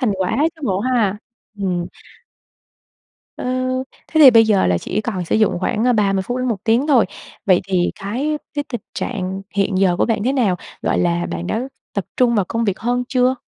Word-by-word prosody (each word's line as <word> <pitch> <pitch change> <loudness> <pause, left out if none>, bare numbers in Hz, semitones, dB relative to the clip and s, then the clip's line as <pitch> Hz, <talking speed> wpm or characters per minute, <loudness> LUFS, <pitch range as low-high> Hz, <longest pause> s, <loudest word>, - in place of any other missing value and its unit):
thành 240 -6 +1
quả 185 -1 -1 0.2
chứ 310 - -18
bộ 195 -4 0
ha? 230 -5 +1 0.4
Ừm. 180 -3 -1 1.5
Ờ, - - -6 0.6
thế 315 - +1
thì 275 -4 +11
bây 225 -1 +6
giờ 210 - +3
là 90 -1 +2
chỉ 210 - -2
còn 195 -6 -3
sử 165 - 0
dụng 215 -5 +2
khoảng, 215 +4 0
ờ, 250 - +4
30 200 +2 0
đến 255 0 -1
1 210 -3 -3
tiếng 235 +6 +2
thôi, 255 -9 +4 0.4
vậy 185 -3 +5
thì 180 -2 +1
cái 260 +10 -2 0.2
với 290 - -1
tình 240 -5 -4
trạng 190 -4 -3
hiện 195 -1 +1
giờ 185 -2 +3
của - - +3
bạn 225 -3 0
thế 260 - +2
nào? 220 -10 +2 0.3
Gọi - - +1
là, 175 0 +1
bạn 85 0 -4
đã 225 - -1 0.3
tập 200 -4 -2
trung 245 -2 +3
vào 205 -4 +2
công 230 +5 -2
việc 200 -3 -1
hơn 245 +1 -1
chưa? 255 0 +2
210 Hz, 205 wpm, -19 LUFS, 190-245 Hz, 1.5 s, thì